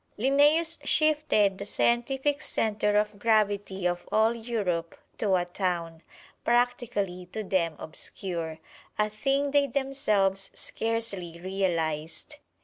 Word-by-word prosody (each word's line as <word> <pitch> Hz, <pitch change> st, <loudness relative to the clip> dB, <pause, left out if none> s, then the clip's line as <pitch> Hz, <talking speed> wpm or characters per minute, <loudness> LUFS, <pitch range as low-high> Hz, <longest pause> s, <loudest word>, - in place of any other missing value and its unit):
Linnæus 295 Hz, +7 st, +3 dB
shifted 295 Hz, -11 st, +2 dB
the 200 Hz, -, -5 dB
scientific 265 Hz, +7 st, +1 dB
center 210 Hz, -4 st, +1 dB
of 210 Hz, -1 st, 0 dB
gravity 205 Hz, -4 st, +1 dB
of 175 Hz, 0 st, -3 dB
all 220 Hz, +1 st, +4 dB
Europe 205 Hz, -8 st, -2 dB, 0.2 s
to 200 Hz, -3 st, +2 dB
a 175 Hz, -1 st, +1 dB
town, 175 Hz, -3 st, -3 dB, 0.4 s
practically 235 Hz, -7 st, 0 dB
to 215 Hz, +4 st, -5 dB
them 170 Hz, -5 st, 0 dB
obscure, 165 Hz, 0 st, -3 dB, 0.4 s
a 210 Hz, 0 st, +1 dB
thing 275 Hz, +6 st, 0 dB
they 285 Hz, 0 st, +3 dB
themselves 215 Hz, -8 st, 0 dB
scarcely 205 Hz, -7 st, -2 dB
realized. 170 Hz, -4 st, -2 dB
210 Hz, 110 wpm, -28 LUFS, 180-245 Hz, 0.4 s, all